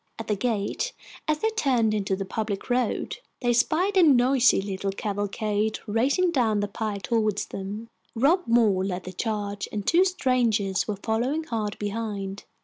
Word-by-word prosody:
At 225 - -5
the 210 - +2
gate, 225 - -1 0.3
as 310 -1 +2
they 445 - +2
turned 250 - +2
into 195 -2 0
the 195 0 -4
public 210 +3 -3
road, 245 -2 0 0.2
they 245 -1 +1
spied 345 - +2
a 375 - +6
noisy 260 -4 +5
little 195 0 -3
cavalcade 205 +1 -1
racing 265 - +2
down 225 -8 +2
the 205 - 0
pike 205 -1 -4
toward 215 -1 +1
them. 205 +4 -5 0.3
Rob 320 +10 +3
Moore 220 -5 +3
led 185 -1 -3
the 185 - -8
charge, 205 0 -3
and 205 -2 -4
two 345 +2 +5
strangers 240 - +1
were 210 - -1
following 250 +8 0
hard 220 -8 -3
behind. 205 -2 -4
220 Hz, 160 wpm, -26 LUFS, 205-255 Hz, 0.3 s, a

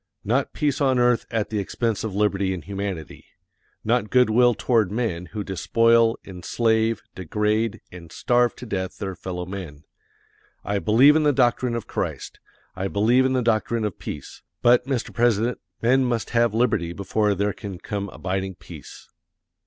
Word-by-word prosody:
Not 125 +6 0
peace 145 -1 -1
on 130 -2 +3
earth 120 -2 +2
at 110 -2 -2
the 105 - -1
expense 110 +2 -2
of 110 -4 -4
liberty 100 -2 +1
and 90 - -8
humanity. 100 -6 -5 0.6
Not 115 -1 +1
good 125 -2 +4
will 120 +1 +4
toward 110 -6 +1
men 100 -6 -2
who 105 -1 -5
despoil, 115 +5 +3
enslave, 110 +4 0
degrade, 105 +5 -1
and 85 -2 -11
starve 120 +6 +1
to 125 - -9
death 95 -4 -4
their 95 -1 -4
fellow 90 -1 -5
men. 90 -6 -8 0.8
I 100 +1 0
believe 125 +9 +5
in 160 - +4
the 150 -1 +4
doctrine 125 -2 +1
of 115 - -4
Christ. - - -4 0.4
I 95 +1 -2
believe 115 +7 +3
in 130 - +1
the 130 -1 +1
doctrine 115 0 0
of 105 - -4
peace; 75 - -8 0.2
but, 125 +1 +4
Mr. 130 -4 -2
President, 120 0 +1 0.2
men 130 +3 +4
must 120 -3 -2
have 115 -1 +3
liberty 85 -8 +1
before 105 +2 0
there 100 +1 0
can 100 -4 -7
come 100 +2 -5
abiding 95 +1 -4
peace. - - -12
110 Hz, 165 wpm, -23 LUFS, 95-120 Hz, 0.8 s, believe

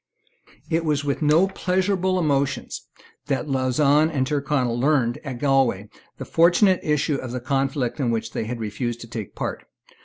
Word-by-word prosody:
It 165 +1 +1
was 150 -2 0
with 140 +1 -1
no 155 +5 +4
pleasurable 185 0 0
emotions 140 -4 -1 0.4
that 135 +3 -1
Lauzun 140 +3 +2
and 140 -5 0
Tyrconnel 135 -4 -1
learned 130 -3 +1
at 130 -4 -6
Galway 130 -7 +1 0.3
the - - -6
fortunate 180 +3 +4
issue 150 -1 0
of 130 -2 -6
the 125 - -3
conflict 135 0 -1
in 130 -4 0
which 115 -1 -2
they - - -3
had 120 +1 -5
refused 115 +2 -4
to 115 - -9
take 110 -3 -5
a - - -32
part. - - -5
140 Hz, 165 wpm, -23 LUFS, 120-155 Hz, 0.4 s, no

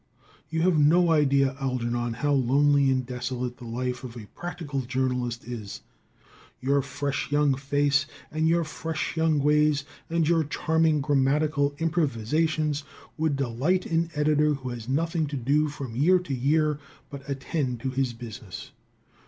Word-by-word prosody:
You 160 +1 0
have 175 -3 +3
no 165 +4 +5
idea, 140 -3 +3
Algernon, 120 -2 -1
how 145 +5 0
lonely 140 +2 +3
and 130 -1 +1
desolate 125 0 -4
the 125 - -10
life 125 +2 -3
of 125 -2 -8
a 110 - -8
practical 165 -5 -5
journalist 125 -2 -2
is. 115 -4 -7 0.8
Your 140 +2 +2
fresh 140 +1 -3
young 145 -1 +3
face 140 +1 +1 0.2
and 155 +1 +1
your 170 +1 +3
fresh 160 +1 -4
young 160 -1 +2
ways, 150 0 +3 0.2
and 165 -1 +1
your 165 -1 +3
charming 160 0 +1
grammatical 145 +1 +1
improvisations, 155 0 0 0.3
would 155 -2 0
delight 140 +8 0
an 165 0 0
editor 150 0 +3
who 130 -2 -6
has 120 -1 -7
nothing 160 +3 0
to 140 0 -4
do 145 +5 +2
from 135 -5 -7
year 170 +9 +5
to 180 -6 -4
year 150 +3 +1 0.3
but 140 0 -9
attend 135 -2 -2
to 130 - -2
his 130 -2 -1
business. 115 -4 -9
140 Hz, 150 wpm, -26 LUFS, 130-155 Hz, 0.8 s, no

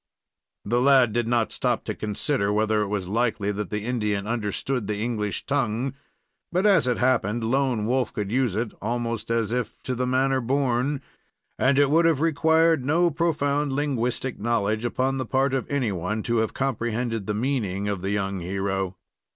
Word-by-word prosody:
The 120 +4 +1
lad 130 -4 +5
did 120 0 0
not 115 -2 +1
stop - - 0
to - - -2
consider 105 +1 -1
whether 110 0 +2
it 105 - -1
was 100 -3 -2
likely 110 -1 0
that 105 -1 -4
the 105 0 -3
Indian 105 -5 -1
understood 115 +1 -2
the 105 - -2
English 105 -2 -2
tongue; 130 -2 0 0.6
but, 180 +3 +1
as 185 -10 +5
it 125 - +1
happened, 120 -3 +1
Lone 125 -2 +1
Wolf 125 -1 0
could 105 -1 -4
use 125 -4 +1
it 115 0 -1
almost 115 -2 -2
as 115 -2 0
if 120 -2 -2
to 130 - -2
the 125 +1 -1
manner 130 +1 +2
born; 135 +2 0 0.6
and 130 +1 +3
it 145 -1 +4
would 165 +2 +4
have 165 -4 +3
required 160 -1 +3
no 170 +5 +2
profound 145 -3 0
linguistic 130 -3 -1
knowledge 110 0 0
upon 130 +2 0
the 130 - -2
part 135 +2 +1
of 135 - -2
anyone 105 - -1
to 120 0 0
have 110 0 0
comprehended 120 -4 -2
the 105 - -1
meaning 105 -5 -1
of 100 -3 -2
the 95 - -2
young 100 -1 -1
hero. 95 +1 -2
120 Hz, 175 wpm, -25 LUFS, 105-135 Hz, 0.6 s, lad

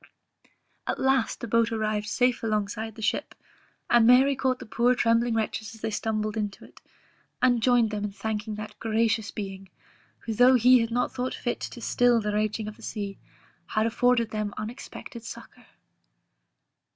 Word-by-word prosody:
At - - -1
last 265 -3 +1
the 235 - -4
boat 230 +1 +2
arrived 215 -1 -1
safe 250 +2 +1
along 215 -3 0
side 220 +1 -5
the 220 - -8
ship, 210 - -1 0.5
and 235 -2 +5
Mary 265 +3 +6
caught 260 -1 0
the 255 - -10
poor 240 +3 +2
trembling 230 0 +2
wretches 220 0 -3
as 220 - -16
they 220 - -2
stumbled 215 0 -2
into 205 -2 -4
it, - - -18 0.6
and 245 -2 +3
joined 240 -2 +3
them 210 -1 -2
in 205 - -4
thanking 215 +1 -4
that 215 0 -8
gracious 225 -1 0
Being, 195 -2 -7 0.5
who 225 - -4
though 250 +4 +6
He 250 +1 +6
had 230 -1 0
not 245 +2 -1
thought 255 0 -3
fit 240 - -3
to 240 - -7
still 245 0 +3
the 210 -1 -2
raging 215 0 -1
of 215 - -8
the - - -17
sea, 200 -3 -5 0.5
had 215 +1 0
afforded 235 0 +2
them 210 -1 -3
unexpected 235 +1 -8
succour. - - -11
225 Hz, 175 wpm, -26 LUFS, 215-245 Hz, 0.6 s, Mary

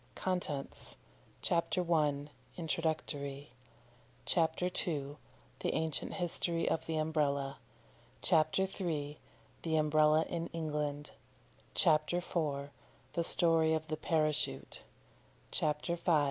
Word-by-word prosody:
CONTENTS. 175 -7 -3 0.5
CHAPTER 175 +1 +1
I. 145 -2 +1 0.3
INTRODUCTORY 150 -4 -2 0.7
CHAPTER 165 0 +2
II. 150 -5 -1 0.4
THE - - -1
ANCIENT 160 -2 -1
HISTORY 170 -2 0
OF 160 0 0
THE 160 -1 -1
UMBRELLA 145 -3 0 0.6
CHAPTER 160 +4 +4 0.2
III. 150 -5 -2 0.4
THE 160 -1 0
UMBRELLA 155 +1 +4
IN 170 -1 -3
ENGLAND 150 -2 -2 0.6
CHAPTER 155 +1 +3
IV. 145 -5 -2 0.4
THE 170 - +1
STORY 165 -2 +4
OF 155 0 -4
THE 155 - -1
PARACHUTE 155 -1 0 0.7
CHAPTER 150 +3 0
V. 170 +1 0
155 Hz, 100 wpm, -34 LUFS, 150-165 Hz, 0.7 s, CHAPTER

